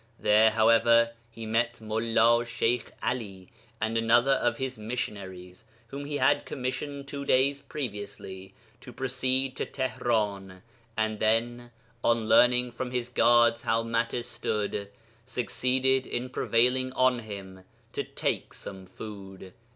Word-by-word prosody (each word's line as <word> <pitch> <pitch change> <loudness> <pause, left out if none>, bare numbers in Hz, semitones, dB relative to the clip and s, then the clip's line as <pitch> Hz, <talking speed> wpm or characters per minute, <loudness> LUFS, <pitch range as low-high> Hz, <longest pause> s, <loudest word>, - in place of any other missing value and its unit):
There, 110 +1 +5
however, 115 +1 +4 0.2
he 115 -1 -9
met 115 +2 +1
Mullā 115 +1 +2
Sheykh 120 0 -1
Ali... 100 -7 -4 0.3
and 110 +1 0
another 120 +4 +4
of 135 - +1
his 130 -1 -3
missionaries, 100 -6 -6 0.2
whom 140 +2 -6
he 145 0 -3
had 145 0 +3
commissioned 140 +1 -5
two 140 0 -5
days 140 +1 +2
previously 100 -7 -6 0.2
to 125 0 -11
proceed 130 +1 0
to - - -1
Tihran; 105 -7 -2 0.3
and 110 -1 -1
then, 120 +2 0 0.3
on 115 -2 +2
learning 125 +2 +5
from 130 +1 -5
his 125 -1 -3
guards 120 -1 +4
how 115 0 +1
matters 115 +1 -1
stood, 105 -3 -3 0.3
succeeded 130 +2 +1
in 125 +1 -3
prevailing 125 +1 +2
on 130 -1 +3
him 100 -4 -9 0.3
to - - -2
take - - -3
some 95 -1 -9
food.' 95 -1 -10
115 Hz, 130 wpm, -28 LUFS, 110-125 Hz, 0.3 s, There